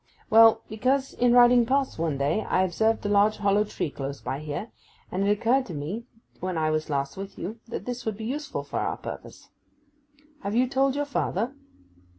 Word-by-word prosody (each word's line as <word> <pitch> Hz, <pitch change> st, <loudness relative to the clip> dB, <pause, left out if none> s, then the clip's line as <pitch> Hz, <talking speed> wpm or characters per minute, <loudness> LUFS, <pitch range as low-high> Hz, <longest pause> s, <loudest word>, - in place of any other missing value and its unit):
Well, 225 Hz, 0 st, +7 dB
because 260 Hz, +5 st, 0 dB
in 245 Hz, 0 st, +2 dB
riding 245 Hz, 0 st, +7 dB
past 265 Hz, -3 st, 0 dB
one 160 Hz, -4 st, 0 dB
day 140 Hz, +10 st, +1 dB
I 185 Hz, -, +1 dB
observed 220 Hz, +5 st, +1 dB
a -, -, +2 dB
large 205 Hz, +1 st, +3 dB
hollow 205 Hz, 0 st, +2 dB
tree 170 Hz, -7 st, -3 dB
close 140 Hz, 0 st, -5 dB
by 135 Hz, -, -4 dB
here, 155 Hz, +8 st, -5 dB, 0.4 s
and 195 Hz, +2 st, 0 dB
it -, -, +3 dB
occurred 235 Hz, +6 st, +2 dB
to 175 Hz, -, -6 dB
me 185 Hz, -, -5 dB, 0.3 s
when 185 Hz, -2 st, -3 dB
I 155 Hz, -1 st, +1 dB
was 155 Hz, 0 st, -1 dB
last 140 Hz, +1 st, -2 dB
with 195 Hz, 0 st, -7 dB
you 215 Hz, +6 st, -6 dB
that 230 Hz, -, -6 dB
this 245 Hz, 0 st, -4 dB
would 220 Hz, -3 st, -3 dB
be 220 Hz, -, -6 dB
useful 290 Hz, +4 st, -4 dB
for -, -, -4 dB
our -, -, -2 dB
purpose. -, -, -9 dB, 0.9 s
Have 200 Hz, +2 st, -3 dB
you 250 Hz, +2 st, +3 dB
told 270 Hz, +1 st, +1 dB
your 290 Hz, 0 st, 0 dB
father? 250 Hz, -3 st, -1 dB
215 Hz, 195 wpm, -26 LUFS, 175-245 Hz, 0.9 s, Well